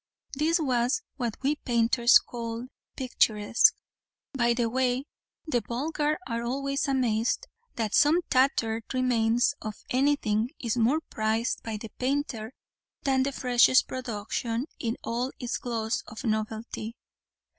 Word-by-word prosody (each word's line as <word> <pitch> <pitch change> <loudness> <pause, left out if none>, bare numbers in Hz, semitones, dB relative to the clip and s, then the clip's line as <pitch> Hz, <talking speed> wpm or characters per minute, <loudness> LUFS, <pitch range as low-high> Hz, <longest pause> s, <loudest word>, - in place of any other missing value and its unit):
This 315 +5 +2
was 255 - +1
what 240 -5 -2
we 290 +3 +1
painters 235 -1 +4
call 230 0 -5 0.3
picturesque. 230 - +3 0.6
By 240 -3 +2
the 235 -1 +1
way, 255 +2 0 0.4
the 250 -7 0
vulgar 295 +7 -1
are 230 -2 -2
always 275 +4 -1
amazed 245 - +1 0.3
that 220 -3 -2
some 315 +4 +5
tattered 240 -4 +2
remains 240 0 +2
of 215 -1 -5 0.2
anything 250 -5 +2
is 235 -2 -1
more 250 +7 +2
prized 220 -2 -1
by 220 -2 -4
the 220 +1 -8
painter 255 -4 -1 0.5
than 265 -1 +2
the 275 +1 0
freshest 250 -1 +4
production 230 0 -3
in 230 -1 -2
all 245 +3 -2
its 245 - -3
gloss 230 -2 -2
of 220 +4 -8
novelty. 220 0 -3
240 Hz, 125 wpm, -27 LUFS, 225-265 Hz, 0.6 s, some